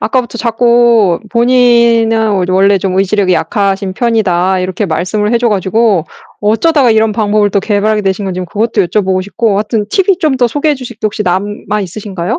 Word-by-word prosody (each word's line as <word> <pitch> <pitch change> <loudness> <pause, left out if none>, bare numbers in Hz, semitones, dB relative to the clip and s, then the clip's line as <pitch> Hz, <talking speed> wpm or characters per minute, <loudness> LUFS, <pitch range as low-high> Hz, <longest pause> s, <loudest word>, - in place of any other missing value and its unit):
아까부터 235 +1 -2
자꾸 235 -5 +2
"본인은 235 -4 +2
이제 185 - -3
원래 195 +1 +3
좀 190 0 -2
의지력이 195 -1 +1
약하신 195 +3 -1
편이다." 190 -5 0
이렇게 185 +3 -3
말씀을 185 +6 -2
해 235 - +2
줘 240 0 +1
가지고 205 -2 +1 0.4
어쩌다가 250 +6 +2
이런 220 0 +2
방법을 210 -1 +1
또 200 - 0
개발하게 210 +1 0
되신 195 +1 -2
건지 185 -1 -4
그것도 220 +2 0
여쭤보고 185 0 -1
싶고 205 +2 -1
하여튼 210 0 -2
팁이 385 - +1
좀 305 -6 0
더 250 -1 +2
소개해 290 +5 0
주실 255 -4 -9
게 - - -70
혹시 210 0 -3
남아 205 +3 -2
있으신가요? 195 +2 -5
210 Hz, 405 characters per minute, -11 LUFS, 190-235 Hz, 0.4 s, 원래